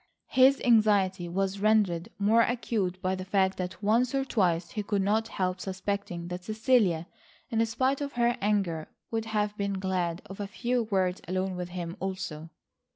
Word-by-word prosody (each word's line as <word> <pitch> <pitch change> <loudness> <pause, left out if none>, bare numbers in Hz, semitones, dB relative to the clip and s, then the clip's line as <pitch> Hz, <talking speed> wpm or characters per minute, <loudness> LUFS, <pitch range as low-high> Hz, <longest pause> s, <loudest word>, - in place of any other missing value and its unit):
His 265 +1 +5
anxiety 200 -6 +3
was 195 +2 -1
rendered 205 -3 +2
more 215 +3 +4
acute 220 -6 -1
by 185 0 +1
the 185 0 -4
fact 190 0 +1
that 185 +3 -5
once 230 +5 +2
or 270 0 +1
twice 175 -8 +1
he 215 - -2
could 200 -1 0
not 220 +3 +1
help 185 -3 -2
suspecting 190 -2 -3
that 180 0 -5
Cecilia, 215 -5 +2 0.5
in 225 0 +2
spite 260 +5 0
of 285 0 -3
her 240 0 +2
anger, 195 -6 0 0.2
would 225 -1 -1
have 210 -1 -1
been 200 0 -1
glad 185 -3 -2
of 195 - -10
a 205 - -3
few 240 +3 -1
words 190 -3 0
alone 185 +1 -1
with 180 0 -4
him, 175 -1 -5
also. 185 -5 -4
195 Hz, 170 wpm, -28 LUFS, 185-220 Hz, 0.5 s, His